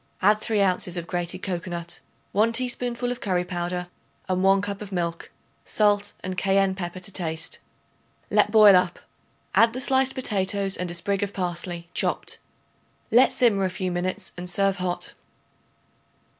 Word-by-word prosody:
Add 210 +2 +5
3 215 -2 +1
ounces 180 -1 +1
of 170 - -4
grated 175 +2 -3
cocoanut, 175 -2 -4 0.3
1 220 +3 +2
teaspoonful 245 0 0
of 245 - -5
curry 180 -3 0
powder 180 0 -3 0.4
and 185 -1 0
1 195 +1 +4
cup 200 0 -4
of 205 -1 -8
milk, 170 -2 -3 0.3
salt 205 -1 +2
and 185 0 -4
cayenne 195 +1 +2
pepper 185 -1 -5
to 185 +2 -8
taste. 160 -4 -3 0.7
Let 210 0 +4
boil 210 -2 +8
up. 180 -1 +2 0.6
Add 230 0 +5
the 255 - -4
sliced 265 0 +2
potatoes 200 -5 +1
and 180 -1 -3
a 175 - -4
sprig 195 +3 -1
of 205 0 -2
parsley 175 -1 -3
chopped. - - -1 0.7
Let 245 +3 +6
simmer 215 -6 +2
a 190 - +1
few 185 0 -3
minutes 185 +3 -2
and 180 0 -5
serve 195 +1 +1
hot. 180 -1 -2
190 Hz, 155 wpm, -25 LUFS, 180-210 Hz, 0.7 s, boil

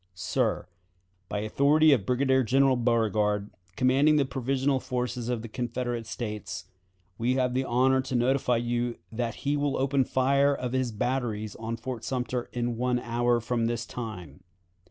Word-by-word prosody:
"Sir: - - -1 0.6
By 105 - -2
authority 145 +8 +4
of 115 -9 +2
Brigadier 130 +1 +3
General 135 +2 +3
Beauregard, 110 -4 +1 0.2
commanding 135 +4 +4
the 145 -2 +3
provisional 135 +1 0
forces 125 -1 -3
of 120 -2 -2
the - - -5
Confederate 120 0 -3
States, 105 -5 -5 0.5
we 120 +3 +1
have 125 -1 +1
the 130 +1 +1
honor 130 +2 +3
to 130 -1 -4
notify 125 0 +2
you 120 0 -1
that 115 0 -2
he 145 +1 +2
will 145 -1 0
open 135 +1 +2
the 130 - -2
fire 140 +2 +3
of 125 -2 -4
his 130 -2 0
batteries 110 -2 -2
on 115 +1 -4
Fort 120 -1 -6
Sumter 125 -1 -2
in 120 -1 -2
one 125 +1 +1
hour 120 0 +1
from 115 0 -1
this 120 0 -2
time. 90 - -7
125 Hz, 160 wpm, -27 LUFS, 115-130 Hz, 0.6 s, authority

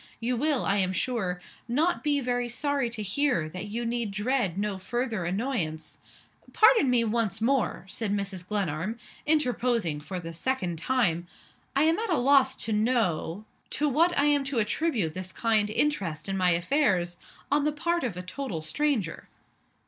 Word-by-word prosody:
You 240 +2 -1
will, 285 +1 +1
I 200 - +2
am 185 -1 +1
sure, 190 -5 -1 0.3
not 305 +9 +1
be 290 -1 +2
very 245 -1 -1
sorry 280 0 0
to 225 -2 -4
hear 245 - +1
that 185 +5 -6
you 235 +3 -3
need 235 -1 -1
dread 210 -2 0
no 200 -1 -2
further 230 -2 -2
annoyance 180 - -2 0.3
" - - -26
"Pardon 435 - +6
me 245 -2 +3
once 220 -3 0
more," 240 -5 0
said 205 +2 -3
Mrs. 195 -3 -3
Glenarm, 195 +1 -1 0.3
interposing 245 - +1
for 180 +5 -6
the 165 -1 -7
second 180 -4 -2
time. 175 -7 +1 0.5
"I 275 - +4
am 325 +4 +3
at 450 -1 -2
a 335 - +2
loss 270 +1 +4
to 225 - -1
know 210 -5 0 0.2
to 300 - 0
what 330 +6 +2
I 285 - +4
am 290 -1 +3
to 275 -2 -3
attribute 220 - 0
this 185 0 -5
kind 220 -3 +1
interest 200 - 0
in 195 - -2
my 185 -1 +3
affairs 175 - +1 0.3
on 290 0 +3
the 300 - +2
part 340 +3 -1
of 220 -8 -3
a 180 - -5
total 185 - -5
stranger." 225 - -1
230 Hz, 170 wpm, -27 LUFS, 185-275 Hz, 0.5 s, Pardon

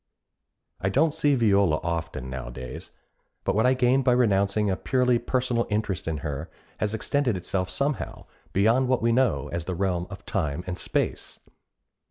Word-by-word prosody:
I 95 - 0
don't 155 +9 +3
see 145 -3 +2
Viola 100 -9 +3
often 85 -5 -3
nowadays, 65 -1 -7 0.5
but - - +1
what 110 +3 +3
I 130 - +4
gained 130 +1 +3
by 125 -1 +4
renouncing 105 -3 +2
a 95 - +1
purely 125 +3 +2
personal 125 -1 0
interest 105 -4 -2
in 80 -1 -1
her 75 +2 -4 0.3
has 105 +1 0
extended 125 -1 0
itself 90 +1 -2
somehow 140 0 -2 0.3
beyond 115 +7 +3
what 125 -2 +1
we 115 - +3
know 115 - +2
as 85 -1 -4
the 90 - -3
realm 90 -1 -1
of 100 - -10
time 80 -1 -2
and 90 -1 -3
space. - - -2
100 Hz, 165 wpm, -26 LUFS, 85-125 Hz, 0.5 s, I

